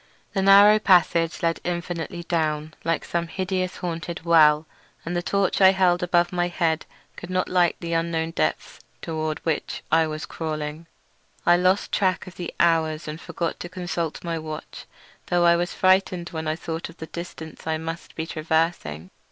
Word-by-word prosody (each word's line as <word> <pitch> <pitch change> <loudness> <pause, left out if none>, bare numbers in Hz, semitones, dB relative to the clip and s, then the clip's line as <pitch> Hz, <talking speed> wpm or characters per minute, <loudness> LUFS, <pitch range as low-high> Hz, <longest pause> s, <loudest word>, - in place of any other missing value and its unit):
The 195 - +1
narrow 200 +2 +7
passage 170 -5 +3
led 165 0 +1
infinitely 175 -1 -4
down 155 -2 -1
like 165 0 -1
some 170 0 -2
hideous 185 0 -2
haunted 165 0 -5
well, 155 -2 +5 0.4
and 170 +2 -3
the 175 - 0
torch 200 +1 0
I 190 0 +8
held 180 -2 +3
above 175 0 +2
my 175 0 +1
head 165 -2 -1 0.3
could 175 - -9
not 185 0 0
light 180 -2 +2
the 170 -1 -3
unknown 165 0 0
depths 80 - -2 0.2
toward 155 -1 -2
which 160 -3 -2
I 160 0 +4
was 155 0 -5
crawling. 155 0 -5 0.6
I 175 - +6
lost 185 +3 +2
track 185 -2 +1
of 185 - -10
the 175 -2 -5
hours 160 -2 +2
and 155 +1 -6
forgot 170 -1 -4
to 175 - -6
consult 175 -3 -4
my 165 -1 -2
watch, 155 -1 -8 0.4
though 175 -1 +2
I 170 0 +6
was 175 +1 -1
frightened 185 -2 +2
when 160 -1 -5
I 155 - 0
thought 165 0 -5
of 165 - -14
the 160 - -6
distance 160 -2 -9
I 160 0 0
must 165 +1 -7
be 160 - -3
traversing. 160 - -1
170 Hz, 175 wpm, -24 LUFS, 160-175 Hz, 0.6 s, I